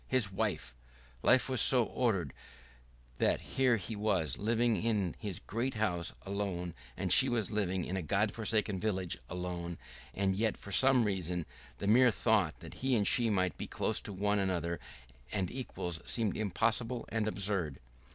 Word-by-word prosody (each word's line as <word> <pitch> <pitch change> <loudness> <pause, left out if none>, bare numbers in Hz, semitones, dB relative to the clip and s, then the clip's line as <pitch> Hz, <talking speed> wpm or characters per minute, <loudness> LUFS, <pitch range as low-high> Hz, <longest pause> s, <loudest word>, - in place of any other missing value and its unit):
His 125 -7 +1
wife! 95 - -2 0.5
Life 130 - +4
was 130 -2 +2
so 125 -3 +6
ordered 100 - -1 0.9
that - - +2
here 130 -2 +1
he 105 +3 -6
was 95 -9 +1
living 115 +2 +1
in 105 -6 0
his 100 -6 -4
great 120 +4 -3
house 90 -6 0
alone, 95 -4 -3 0.2
and 95 -1 +4
she 130 - +7
was 115 -4 +1
living 95 -4 -1
in 95 - -4
a 95 - -1
God 100 +5 0
forsaken 105 -3 0
village 95 -7 -1
alone, 90 -1 -5 0.4
and 95 -1 +1
yet 110 +2 0
for 100 - -10
some 130 +3 +5
reason 90 -5 -2 0.3
the - - -5
mere 125 +5 +6
thought 105 -7 +1
that - - -9
he 130 -1 +2
and 105 -3 +2
she 120 +1 +4
might 95 -5 0
be - - -4
close - - -1
to - - -5
one 100 +2 0
another 85 -4 -1 0.5
and 95 -4 -2
equals 90 -10 -5
seemed 110 -4 0
impossible 115 +4 0
and 110 -1 -1
absurd. 95 -9 +1
100 Hz, 165 wpm, -32 LUFS, 90-115 Hz, 0.9 s, she